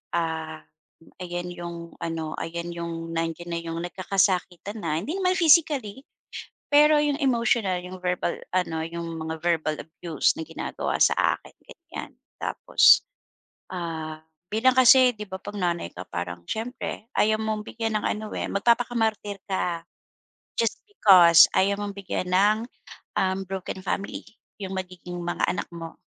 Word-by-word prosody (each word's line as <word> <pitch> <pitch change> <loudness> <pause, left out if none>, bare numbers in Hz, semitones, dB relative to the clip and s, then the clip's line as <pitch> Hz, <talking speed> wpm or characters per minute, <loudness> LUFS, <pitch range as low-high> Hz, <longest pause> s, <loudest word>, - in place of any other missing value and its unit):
ah, 160 -2 -3 0.6
ayan 175 0 -4
yung 170 -1 -6 0.3
ano, 160 -1 -3
ayan 170 +1 -4
yung 165 -1 -5
nandiyan 165 +1 -3
na 170 - -2
yung 165 0 -4
nagkakasakitan 185 +1 0
na, 155 - 0
hindi 280 - -4
naman 370 -1 +1
physically 295 - +4 0.7
pero 300 +1 +6
yung 290 -1 +1
emotional, 235 -7 +2
yung 185 +1 -8
verbal 180 -1 -1
ano, 165 -3 0
yung 170 0 -5
mga 160 0 -4
verbal 165 -3 +1
abuse 160 0 -1
na 160 - -3
ginagawa 165 - -3
sa - - +5 0.2
akin, - - -17
ganyan. 340 0 -9 0.3
Tapos, - - +5 0.7
ah, 160 -3 -5 0.3
bilang 255 +4 +3
kasi 255 -1 +7
'di 210 - -6
ba, 190 -1 -7
'pag 205 - -8
nanay 175 - -1
ka 90 +1 -8
parang 85 -1 -5
siyempre 225 - -5
ayaw 215 +1 +3
mong 215 -1 -2
bigyan 225 -1 -2
ng - - -8
ano, 215 +1 -2
eh, - - -2
magpapakamartir 220 -2 +1
ka 180 -3 -1 0.8
just 230 -2 0
because 185 - +8
ayaw 200 +1 +2
mong 205 -1 -4
bigyan 185 -2 -3
ng, 200 +4 +4 0.6
uhm, 190 0 +1
broken 190 0 -5
family 200 0 -3 0.4
yung 190 -1 -4
magiging 180 -1 -6
mga 175 0 -1
anak - - -1
mo. 165 -1 -8
185 Hz, 140 wpm, -25 LUFS, 170-220 Hz, 0.8 s, because